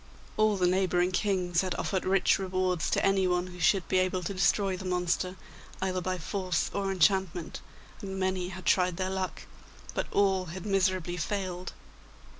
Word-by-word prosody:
All 215 -1 +3
the 180 - +2
neighbouring 180 0 +2
kings 185 -3 +1
had 185 -2 -2
offered 190 +1 -2
rich 190 0 +3
rewards 185 -2 0
to - - +1
anyone 185 -2 +2
who 180 -1 -10
should 190 0 +3
be 185 - +2
able 185 0 0
to 185 - -3
destroy 190 +1 +2
the 185 - -7
monster, 180 0 -1 0.4
either 185 -1 -1
by 185 +1 -2
force 185 0 -2
or 195 -1 -1
enchantment, 190 -2 +1 0.4
and 190 -1 -5
many 185 -1 -1
had 185 0 -9
tried 180 -2 +3
their 185 0 -1
luck, 190 -1 -3 0.5
but - - -2
all 190 -2 +2
had 180 +3 -7
miserably 185 -3 +1
failed. 185 0 -3
185 Hz, 165 wpm, -29 LUFS, 180-190 Hz, 0.5 s, All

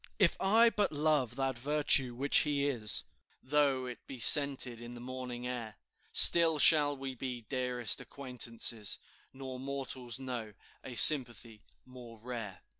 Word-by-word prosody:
"If 190 -6 +1
I 225 +4 +2
but 205 -2 -3
love 145 -5 -2
that 135 -2 -4
virtue 140 -2 0
which 140 +3 +1
he 145 -2 -2
is, 110 -8 -2 0.4
Though 140 -2 -2
it 125 -1 -12
be 135 - -11
scented 130 -2 +7
in 120 +1 -12
the - - -12
morning 125 0 -9
air, 120 -3 -8 0.4
Still 165 -2 +5
shall 145 -1 +3
we 135 0 -8
be 125 -1 -8
dearest 125 -3 -2
acquaintances, 120 -5 -2 0.3
Nor 130 -1 -11
mortals 130 -2 -7
know 125 -5 -9 0.3
a 130 - -11
sympathy 120 -5 +3 0.2
more 125 -3 -15
rare." 115 -4 -10
130 Hz, 140 wpm, -29 LUFS, 120-140 Hz, 0.4 s, scented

